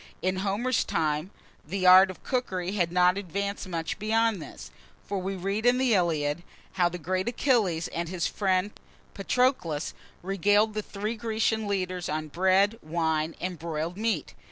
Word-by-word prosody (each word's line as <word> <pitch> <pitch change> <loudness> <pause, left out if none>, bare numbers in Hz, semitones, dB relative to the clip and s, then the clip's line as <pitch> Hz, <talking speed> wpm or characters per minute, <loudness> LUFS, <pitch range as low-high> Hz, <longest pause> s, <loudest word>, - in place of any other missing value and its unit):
In 185 +1 0
Homer's 210 +6 0
time, 155 +1 -1 0.3
the, 185 +4 -3
art 185 +1 +8
of 185 - -10
cookery 190 -8 -2
had 175 -5 0
not 180 +2 +3
advanced 200 +1 -4
much 165 0 -3
beyond 220 -2 +1
this; - - -10 0.3
for 200 - -2
we 190 +1 -3
read 195 +4 -2
in 245 +1 +4
the 255 -2 +2
"Iliad," 165 -4 +1 0.3
how 175 -2 +2
the 180 - -6
great 185 +4 -2
Achilles 220 - +1
and 170 0 -4
his 175 -2 -2
friend 190 0 0 0.4
Patroclus 195 - 0 0.3
regaled 205 +3 +2
the 215 - -2
three 210 +2 -4
Grecian 220 -1 -1
leaders 185 -3 -2
on 155 0 -3
bread, 190 +6 +2
wine, 160 0 -1
and 180 -2 -4
broiled 165 +1 -3
meat. 210 - -2
185 Hz, 155 wpm, -27 LUFS, 170-210 Hz, 0.4 s, art